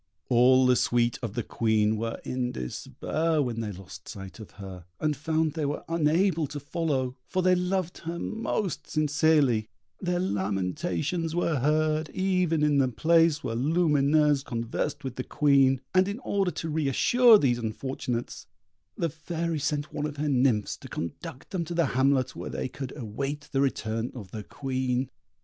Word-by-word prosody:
All 130 +1 +5
the 125 0 +5
suite 120 -1 +1
of 115 -4 -5
the 120 - -1
Queen 110 -1 +1
were 115 +1 -3
in 125 -1 -2
despair 155 - -2
when 120 -5 -1
they 105 -2 -3
lost 95 -1 -11
sight 95 -2 -9
of 110 - -9
her, 95 -3 -9
and 150 -1 0
found 155 +1 0
they 160 -2 -3
were 145 - -3
unable 165 +1 +2
to 145 - -6
follow, 140 -4 -2
for 185 -1 -1
they 185 0 +5
loved 180 -1 -1
her 165 +1 -5
most 215 -3 -3
sincerely; 145 -6 +2 0.3
their 180 -1 -1
lamentations 155 - -1
were 170 -4 +1
heard 155 +2 +1
even 180 -4 +1
in 145 -2 +3
the 135 - +3
place 165 +4 +3
where 115 - -2
Lumineuse 150 0 +3
conversed 120 +3 -3
with 130 -2 -5
the 130 - -2
Queen, 135 -3 +3
and 185 0 +4
in 200 +2 -3
order 200 -6 0
to 165 0 -5
re 155 -2 0
assure 240 - +6
these 125 -9 +1
unfortunates, 120 +1 -4 0.5
the 170 - +1
Fairy 165 +1 -3
sent 145 +1 -2
one 150 0 -1
of 145 -1 -8
her 150 +1 -1
nymphs 125 -6 +2
to - - -11
conduct 130 - -7
them 185 -3 -1
to 170 +1 -5
the 170 -1 +3
hamlet, 130 0 +2
where - - -6
they - - -3
could 130 0 -7
await 140 +6 -4
the 135 - +1
return 115 -3 -1
of 105 -7 -9
the 110 - -5
Queen. 130 0 -2
145 Hz, 170 wpm, -27 LUFS, 125-165 Hz, 0.5 s, assure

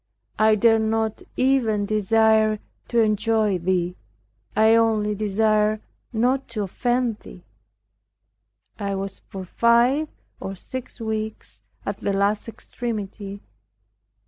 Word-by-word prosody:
I 215 0 +5
dared 225 +1 +4
not 220 0 0 0.2
even 240 -6 +2
desire 215 +1 +3 0.3
to 235 -1 +2
enjoy 215 -2 +2
Thee 180 0 0 0.6
I 220 +1 +5
only 220 -2 +3
desired 215 +1 +2 0.3
not 250 +4 +1
to 220 -3 -3
offend 240 +3 0
Thee. - - -13 1.4
I 200 -1 -2
was 195 0 -5
for 190 -1 -6
five 240 - +3 0.3
or 195 - -5
six 255 +6 -8
weeks 220 -1 -5 0.2
at - - -3
the 200 - -1
last 200 +2 +1
extremity. 205 -4 -6
215 Hz, 110 wpm, -23 LUFS, 205-230 Hz, 1.4 s, I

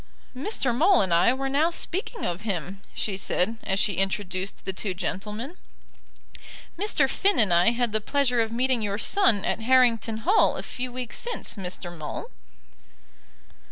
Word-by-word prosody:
"Mr. 265 - 0
Maule 355 +8 +5
and 185 -3 0
I 170 +7 +5
were 270 +1 -2
now 290 +5 +2
speaking 385 +7 -3
of 175 +2 -3
him," 195 -2 -4
she 200 - -2
said, 195 +3 0
as 190 0 -1
she 205 -4 0
introduced 195 0 -2
the 190 - -3
two 185 0 -4
gentlemen. 210 - -5 1.2
"Mr. 340 -7 +2
Finn 395 +8 +1
and 205 -6 +4
I 175 +5 +5
had 235 -1 -1
the 215 - +1
pleasure 250 0 +1
of 225 0 -2
meeting 250 +1 +1
your 200 -1 -1
son 225 - +3
at - - -1
Harrington 230 -2 +3
Hall 400 +5 +4
a - - -4
few 250 0 -5
weeks 250 -1 -4
since, 480 - -3
Mr. 180 -3 -6
Maule." 160 - -6
230 Hz, 160 wpm, -25 LUFS, 195-270 Hz, 1.2 s, Maule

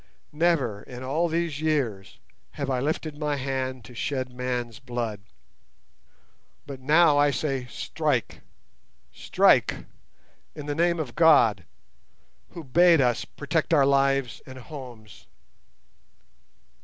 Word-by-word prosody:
Never 150 -10 +1
in 125 0 -10
all 155 +7 0
these 165 -2 -2
years 130 -11 -2 0.4
have 140 -2 -3
I 130 - 0
lifted 150 +2 -3
my 150 -1 -1
hand 130 -3 -3
to 125 - -13
shed 130 +1 -3
man's 125 -3 -4
blood; 120 -5 -4 1.4
but 140 -2 -8
now 150 +2 +4
I 145 0 +4
say 135 -2 -2
strike, - - -2 0.7
strike, - - +2 0.7
in 150 -2 -8
the 145 - -2
name 170 +2 +1
of 135 -7 -4
God, 130 - +4 0.9
Who 170 - -8
bade 165 +4 +4
us 125 -3 +1
protect 160 +3 -1
our 140 -2 +5
lives 135 -2 +1
and 130 0 -10
homes. 125 -5 -11
135 Hz, 120 wpm, -25 LUFS, 125-155 Hz, 1.4 s, our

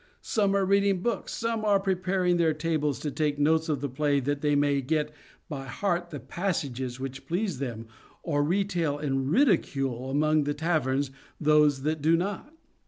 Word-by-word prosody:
Some 200 -3 +1
are 195 -1 +2
reading 200 -1 +2
books, 235 -5 -2
some 230 -1 -2
are 205 -2 +4
preparing 185 -2 +1
their 160 -2 +2
tables 150 -3 0
to 150 - -2
take 150 0 0
notes 160 +2 +2
of 145 -4 0
the 145 - -1
play 140 +2 +1
that 145 +2 -2
they 150 -1 +2
may 145 -1 +2
get 150 +2 -1 0.4
by 135 -5 -6
heart 175 +5 -1
the 150 -4 -6
passages 130 -7 -3
which 135 0 -6
please 180 -3 -1
them 115 -4 -4 0.4
or 145 -3 +1
retail 175 -3 0
in 135 -2 -1
ridicule 135 - +1
among 155 +2 +2
the 145 0 -1
taverns 145 -4 0 0.3
those 150 -3 +4
that 155 0 -1
do 160 +3 +4
not. 200 - -3
150 Hz, 170 wpm, -27 LUFS, 140-180 Hz, 0.4 s, are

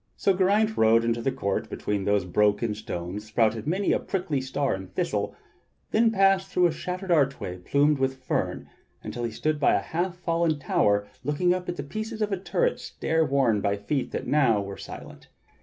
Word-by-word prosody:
So 195 - +3
Geraint 205 +4 +2
rode 115 +1 +5
into 115 0 0
the 135 - 0
court 100 -7 -2
between 100 -1 -3
whose 100 -2 +2
broken 105 +4 +2
stones 105 -1 -5
sprouted 110 +2 +1
many 190 +5 +1
a - - +2
prickly 175 -8 -2
star 135 +2 -1
and 95 -1 -7
thistle, - - -1 0.6
then 225 +1 +4
passed 195 -2 +3
through 180 -1 +3
a 170 - +4
shattered 180 +3 -4
archway 140 - +1
plumed 145 +9 +2
with 130 0 -1
fern, - - -2 0.4
until 110 +3 -5
he 120 - -1
stood 150 +6 -1
by 145 - +4
a - - +3
half 175 +2 -3
fallen 170 -2 0
tower 100 -7 +1 0.2
looking 150 +6 +2
up 180 0 -4
at 175 - -3
a 140 - -3
piece 215 +10 -5
of 200 -3 -1
turret - - 0
stair 160 0 -1
worn 135 -7 +2
by 100 0 0
feet 130 +7 -2
that - - -4
now 130 -8 +3
were 100 -1 -5
silent. - - -10
140 Hz, 190 wpm, -26 LUFS, 110-180 Hz, 0.6 s, rode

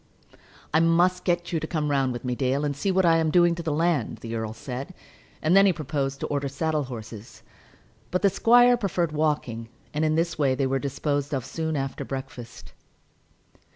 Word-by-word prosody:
"I 160 - +5
must 175 +2 +3
get 175 -1 0
you 165 - +1
to 155 - -5
come 150 -3 -1
round 135 -2 +1
with 120 +1 -6
me, 125 - -1
Dale, 135 +3 0
and 145 -1 -2
see 170 +8 -2
what 190 -1 +2
I 165 -1 +5
am 160 -1 +1
doing 175 +1 +4
to 170 - -5
the 160 -2 -2
land," 160 -4 0
the 115 0 -6
earl 110 -1 -3
said. 130 +9 -7 0.5
And 160 +4 +3
then 195 0 +7
he - - +5
proposed 140 -3 -3
to - - -1
order 140 -1 -2
saddle 150 +1 -1
horses. 110 -2 -9 0.7
But 180 - -1
the 200 - +5
squire 245 +3 +5
preferred 180 -7 -1
walking, 145 -7 -1 0.2
and 150 +1 0
in 155 0 +2
this 165 0 -1
way 135 -3 +2
they 135 - 0
were 135 +1 0
disposed 145 +1 -2
of 130 - -3
soon 160 -1 -3
after 135 -1 -3
breakfast. 130 -3 -8
150 Hz, 200 wpm, -25 LUFS, 135-170 Hz, 0.7 s, then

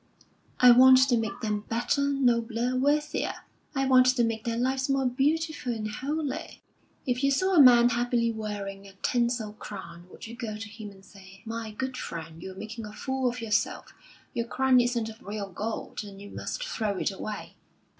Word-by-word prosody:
"I 250 -1 +9
want 260 +2 +8
to 245 - +4
make 225 -3 -2
them 210 -1 -2
better, 240 +5 0
nobler, 245 -3 +1
worthier; 295 +3 0 0.4
I 270 0 +1
want 255 -1 +6
to 255 -1 +3
make 225 -1 -2
their 230 -1 -1
lives 260 +2 0
more 275 -1 +2
beautiful 285 +1 0
and 215 -1 -4
holy." 290 +5 -4 0.4
"If 250 +1 -1
you 275 - +4
saw 375 +8 +1
a 330 - +8
man 240 -2 +8
happily 240 -1 +1
wearing 200 -3 -6
a 195 - -14
tinsel 235 -3 0
crown, 190 -5 -9
would - - -11
you 230 +1 -8
go 225 -3 -5
to 220 +1 -7
him 215 0 -9
and 195 -1 -17
say, 195 -1 -16
'My 225 0 -5
good 255 +4 -4
friend, 165 -6 -7
you're 190 0 -8
making 220 +2 -7
a 210 - -10
fool 265 +2 -1
of 240 -1 -6
yourself. 220 -2 -1 0.4
Your 235 0 -2
crown 260 +1 +3
isn't 240 -2 +1
of 225 +2 -12
real 205 -2 -5
gold, 215 +4 -5
and 200 -1 -11
you 205 0 -10
must - - -5
throw 215 - -2
it - - 0
away. 205 +2 -6
235 Hz, 185 wpm, -27 LUFS, 210-260 Hz, 0.4 s, I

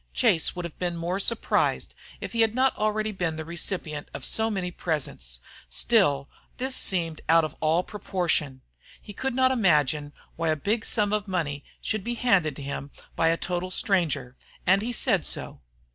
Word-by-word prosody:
Chase 160 - +3
would 180 -1 -4
have 170 - -8
been 175 -1 -1
more 175 +3 -1
surprised 230 +3 +1 0.3
if - - -4
he 230 - +1
had 225 0 +3
not 260 +1 +3
already 215 0 0
been 175 -5 -1
the 160 0 -5
recipient 165 -3 -3
of - - -4
so 220 0 +1
many 190 -4 -2
presents; 130 - -3 0.3
still 140 - +3 0.3
this 260 +1 -1
seemed 165 -4 -1
out 165 0 +6
of 155 - -6
all 160 +3 +3
proportion. 170 -10 -1 0.4
He 205 - -10
could 265 +5 -2
not 260 0 +4
imagine 150 - +2 0.3
why 165 -1 0
a 155 - +3
big 210 +9 -1
sum 210 -2 +1
of 210 -1 0
money 150 -7 -2 0.2
should 215 -3 -1
be 240 +2 -2
handed 185 - +2
him 140 0 -5 0.3
by 165 - +3
a 165 0 +3
total 180 +1 -2
stranger, 170 - 0 0.3
and 195 +2 +5
he 235 +3 -2
said 195 -7 +2
so. - - -4
180 Hz, 175 wpm, -27 LUFS, 155-210 Hz, 0.4 s, out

